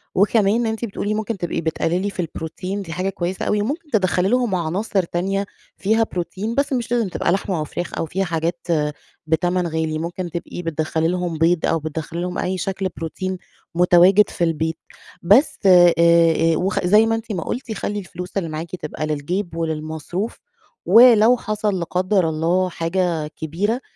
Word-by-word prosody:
وكمان 210 +3 +3
أنتِ 225 +1 -2
بتقولي 205 0 -3
ممكن 220 0 -3
تبقي 175 -1 -3
بتقلّلي 170 +4 -1
في 195 - -11
البروتين 180 +5 -5
دي 165 - -8
حاجة 185 +2 -1
كويسة 185 -1 -3
أوي، 210 -1 +1
وممكن 295 +8 -3
تدخّلي 185 -3 +2
لهم 245 -5 +1
عناصر 185 +4 -1
تانية 195 +4 -2 0.3
فيها 220 +3 +2
بروتين، 190 +5 -3
بس 280 0 0
مش 240 -2 -2
لازم 235 -4 +1
تبقى 175 - -1
لحمة 190 -2 -1
أو - - -1
فراخ 175 +3 -5
أو - - -1
فيها 190 +5 -2
حاجات 170 +1 -3 0.6
بتمن 175 +2 +1
غالي، 160 -1 -2
ممكن 175 +2 -4
تبقي 170 +1 -6
بتدخّلي 160 0 -1
لهم 175 -2 -2
بيض 165 +1 +2
أو 165 - +1
بتدخلي 160 +2 -5
لهم 180 0 -3
أي 185 +1 -1
شكل 190 +1 -2
بروتين 185 +3 -4 0.4
متواجد 180 +3 +5
في 175 - -3
البيت، 160 0 0 0.4
بس 210 - +4
آآ، 175 -2 +7
آآ 165 -1 +4
وخ 190 +3 0
زي 210 +4 +5
ما 225 - +1
أنتِ 225 0 -6
ما 175 -5 -2
قُلتِ 245 -1 -5
خلّي 205 0 -3
الفلوس 180 0 -7
اللي 165 -4 -1
معاكِ 160 +3 -5
تبقى 155 -2 -5
للجيب 165 +4 -3
وللمصروف، 160 +5 -4 0.5
ولو 240 0 +7
حصل 210 -3 -2
لا 170 - -2
قدر 185 -1 +1
الله 170 +4 +1
حاجة 165 -2 -1
كبيرة، 185 - -2
180 Hz, 170 wpm, -21 LUFS, 165-205 Hz, 0.6 s, آآ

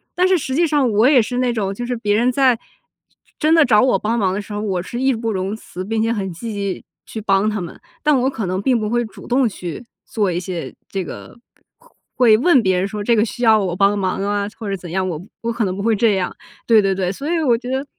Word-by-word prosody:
但 360 - +3
是 375 0 +4
实 265 -4 -3
际 340 +3 +3
上 290 -5 +2
我 215 +5 +4
也 270 -4 +6
是 245 +3 -3
那 250 -1 +1
种， 200 -4 -2
就 240 +5 -5
是 245 0 -2
别 210 -2 0
人 240 +4 +2
在 255 -2 +3 0.8
真 310 +1 +3
的 320 -2 +6
找 210 -3 +4
我 255 - +3
帮 225 +2 -1
忙 190 -3 +1
的 200 - -2
时 205 +1 -9
候， 205 - -3
我 190 -4 -1
是 240 +6 -5
义 265 0 +3
不 225 -1 -2
容 190 +1 -2
辞 185 -4 -8
并 220 +3 -1
且 225 +1 +1
很 195 -4 -3
积 220 +7 -6
极 200 -2 -4 0.2
去 220 - -7
帮 200 0 +2
他 215 -1 -2
们。 175 - -8 0.3
但 300 -2 +4
我 260 - +2
可 225 -6 -4
能 185 +1 -2
并 245 +2 +2
不 215 -1 -2
会 240 +1 +1
主 210 -3 -12
动 255 0 +2
去 180 +1 -7 0.2
做 205 -5 -1
一 175 - -1
些 180 -1 -5 0.2
这 195 -1 -3
个， 180 - -10 0.8
会 230 -4 +5
问 275 +2 +4
别 185 -2 +2
人 190 - 0
说： 205 +1 -5
“这 235 - +2
个 215 0 +3
需 240 +2 -6
要 220 -2 +6
我 180 -2 -2
帮 200 +2 +3
忙 190 0 -1
啊？” 205 0 -1
或 220 -3 -5
者 195 - -2
怎 180 -1 -10
样， 190 +1 -1
我 160 -3 -4 0.2
我 235 - -2
可 230 -2 0
能 185 -1 -2
不 200 - -4
会 225 +1 +2
这 210 0 +3
样， 185 -2 -2 0.3
对 225 -2 +6
对 195 -1 +1
对， 185 -1 -1
所 280 +10 -5
以 335 - +1
我 240 -5 +3
觉 245 +1 -8
得 265 +2 -2
215 Hz, 290 characters per minute, -19 LUFS, 195-245 Hz, 0.8 s, 也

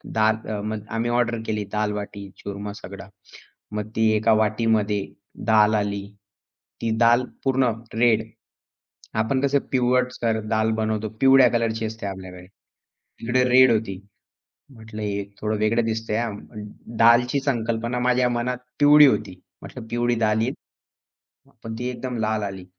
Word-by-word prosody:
दाल 110 0 +3 0.2
अ, 105 -1 -3
मग 110 +1 -3 0.2
आम्ही 120 +1 -1
ऑर्डर 120 -1 +1
केली. 105 -1 -1
दाल-बाटी-चूरमा 100 -1 -5
सगळा. 100 -1 -10 0.7
मग 105 0 -4
ती 110 0 +3
एका 110 +1 +3
वाटीमध्ये, 110 -2 +1 0.5
दाल 110 -1 +5
आली. 100 -1 -2 0.8
ती 115 - -1
दाल 120 +2 +5 0.2
पूर्ण 130 -2 +2 0.3
रेड. 115 -2 +4 1.0
आपण 130 +4 0
कसं 140 0 +2
पिवटसर 125 -3 +1
दाल 110 0 +1
बनवतो. 110 0 -1
पिवळ्या 135 -1 +6
कलरची 115 -1 0
असते 110 -1 -6
आपल्याकडे. 90 -2 -8 0.7
इकडे 120 +2 +1
रेड 130 0 +7
होती. 100 -4 -2 0.7
म्हटलं, 110 -2 -9
"हे 100 -1 -2 0.2
थोडं 110 0 -1
वेगळं 115 +2 +2
दिसतंय 110 -1 -2
हां." 115 -3 -2 0.6
दालची 120 +4 +5
संकल्पना 115 -1 -1
माझ्या 125 0 +2
मनात 120 +1 -2 0.2
पिवळी 145 +1 +8
होती. 90 -7 -1 0.2
म्हटलं 110 - -10
पिवळी 120 +1 0
दाल 105 +1 +1
येईल. 125 +3 0 0.9
हा - - -24
पण 110 0 -6
ती 125 - -3
एकदम 125 0 -5
लाल 110 -1 -1
आली. 95 -2 -6
110 Hz, 135 wpm, -23 LUFS, 105-120 Hz, 1.0 s, पिवळी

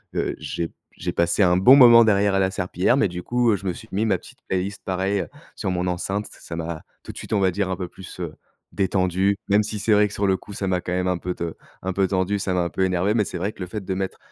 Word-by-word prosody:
heu, - - -1
j'ai 85 - -3
p - - -25 0.2
j'ai - - -3
passé 85 +4 +1
un 90 -1 +4
bon 125 +8 +8
moment 120 -3 +9
derrière 100 -1 +3
à - - +3
la 95 0 +2
serpillière, 90 +6 +1
mais 110 - +3
du 90 0 -6
coup, 120 -1 +1
heu, - - +3
je 100 - -8
me 90 - 0
suis 110 - -11
mis 105 +4 0
ma 110 - +2
petite - - -15
playlist 95 +2 -2
pareil 95 +1 0 0.3
sur 95 -5 -2
mon 90 0 -1
enceinte. 95 +3 -2
Ç - - -15
ça 85 - -8
m'a 80 -1 -5 0.2
tout - - -8
de - - -14
suite - - -9
on 105 - +3
va 95 -1 +3
dire 95 0 -1
un - - 0
peu 90 -1 -5
plus, 90 0 -12
heu, 85 -4 -5 0.4
détendu, 95 0 +1
même 105 +1 +4
si 105 0 -4
c'est 110 +1 +2
vrai 105 0 +5
que 105 - -10
sur 100 0 0
le 95 -1 +2
coup 100 - -12
ça 95 -1 -3
m'a 90 -1 +1
quand 90 - -5
même 90 0 0
un 90 -1 +1
peu 90 +1 -4
t 85 - -6 0.4
un 95 0 -3
peu 95 0 +2
tendu, 95 +2 0
ça 95 -1 -1
m'a 90 - +1
un 85 - -2
peu 95 - -1
énervé, 95 +3 +1
mais 105 - +2
c'est 90 - -5
vrai 100 +4 -1
que - - -22
le 90 - -3
fait 105 +1 -5
de 95 0 -3
mettre, 95 0 -3
95 Hz, 300 wpm, -23 LUFS, 90-100 Hz, 0.4 s, moment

